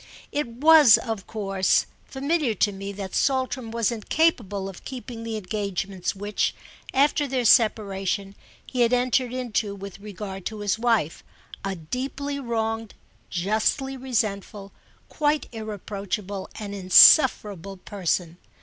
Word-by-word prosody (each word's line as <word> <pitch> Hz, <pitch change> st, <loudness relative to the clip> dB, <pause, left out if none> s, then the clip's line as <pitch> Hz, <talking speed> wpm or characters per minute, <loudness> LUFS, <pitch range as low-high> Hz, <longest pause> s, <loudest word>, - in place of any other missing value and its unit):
It 295 Hz, -2 st, -1 dB
was 285 Hz, +1 st, +7 dB
of 220 Hz, -5 st, -5 dB
course 195 Hz, -3 st, +1 dB, 0.2 s
familiar 280 Hz, -3 st, -1 dB
to 205 Hz, -, +2 dB
me 195 Hz, 0 st, -6 dB
that 195 Hz, -1 st, -7 dB
Saltram 260 Hz, -3 st, 0 dB
was 230 Hz, 0 st, 0 dB
incapable 220 Hz, -, 0 dB
of 195 Hz, -2 st, -10 dB
keeping 245 Hz, -3 st, -7 dB
the 225 Hz, -1 st, -4 dB
engagements 195 Hz, -2 st, -3 dB
which, 205 Hz, +1 st, -1 dB, 0.4 s
after 285 Hz, +1 st, +2 dB
their 255 Hz, -2 st, -1 dB
separation, 200 Hz, -4 st, +2 dB, 0.3 s
he 250 Hz, -, -2 dB
had 235 Hz, +1 st, +3 dB
entered 250 Hz, 0 st, +1 dB
into 230 Hz, -5 st, -2 dB
with 200 Hz, -1 st, -9 dB
regard 200 Hz, -2 st, -7 dB
to 215 Hz, -1 st, -6 dB
his 205 Hz, +1 st, 0 dB
wife, 225 Hz, -10 st, 0 dB, 0.4 s
a 195 Hz, -1 st, -2 dB
deeply 270 Hz, -, -4 dB
wronged, 225 Hz, -3 st, -3 dB, 0.3 s
justly 215 Hz, +8 st, 0 dB
resentful, 210 Hz, -6 st, -3 dB, 0.4 s
quite 300 Hz, -1 st, 0 dB
irreproachable 205 Hz, -2 st, -5 dB
and 205 Hz, -2 st, -6 dB
insufferable 195 Hz, -, +5 dB
person. 180 Hz, -2 st, -3 dB
215 Hz, 120 wpm, -25 LUFS, 195-250 Hz, 0.4 s, was